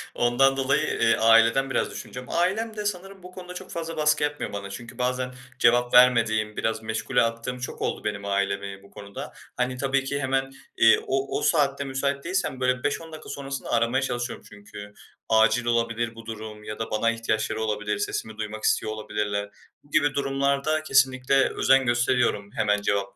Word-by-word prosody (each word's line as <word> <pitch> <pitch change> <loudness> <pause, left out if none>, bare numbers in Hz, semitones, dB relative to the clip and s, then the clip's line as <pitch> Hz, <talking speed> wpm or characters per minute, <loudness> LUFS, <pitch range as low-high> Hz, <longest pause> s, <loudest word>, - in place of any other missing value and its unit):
Ondan 135 +3 +3
dolayı, 135 +2 +2 0.2
eee, 115 0 +4
aileden 115 +4 +4
biraz - - 0
düşüneceğim. 125 0 -8
Ailem 215 +6 0
de 210 - -4
sanırım 195 -1 -4
bu 180 - -10
konuda 180 -1 -9
çok 185 +1 -9
fazla 165 -1 -5
baskı 150 0 +2
yapmıyor 145 -7 -2
bana 100 0 -5
çünkü 115 +4 -9
bazen 125 0 -1 0.3
cevap 120 +1 +3
vermediğim 115 -4 +4
biraz 110 0 -1
meşgule 110 +1 0
attığım 115 +2 -2
çok 125 - -6
oldu - - -2
benim 100 -1 -3
ailemi 100 0 -2
bu 100 - -18
konuda. 100 0 -9 0.2
Hani 125 0 -1
tabii 135 0 0
ki 140 +1 -2
hemen, 135 0 0 0.3
eee, 110 0 +6
o 135 +1 -1
o - - -7
saatte 140 -3 +2
müsait 140 +1 -2
değilsem 180 -7 -2
böyle 125 0 0
5-10 165 -1 -2
dakika 155 - -10
sonrasında 140 0 -5
aramaya 120 +3 +2
çalışıyorum 120 -2 -3
çünkü. 105 0 -11 0.4
Acil 110 +2 +4
olabilir 115 -1 0
bu 115 0 -11
durum 110 -1 -8
ya 105 +1 -7
da 110 - -4
bana 115 +2 +2
ihtiyaçları 110 -1 -2
olabilir, 105 -1 -1
sesimi 110 +1 -3
duymak 110 0 -5
istiyor 110 - +1
olabilirler. 105 -1 -3 0.3
Bu 145 - -25
gibi 145 -3 +3
durumlarda 140 +2 0
kesinlikle 135 -2 +3
özen 135 0 +3
gösteriyorum 120 -4 +1
hemen 105 -1 +1
cevap 100 -1 -1
120 Hz, 175 wpm, -25 LUFS, 110-135 Hz, 0.4 s, eee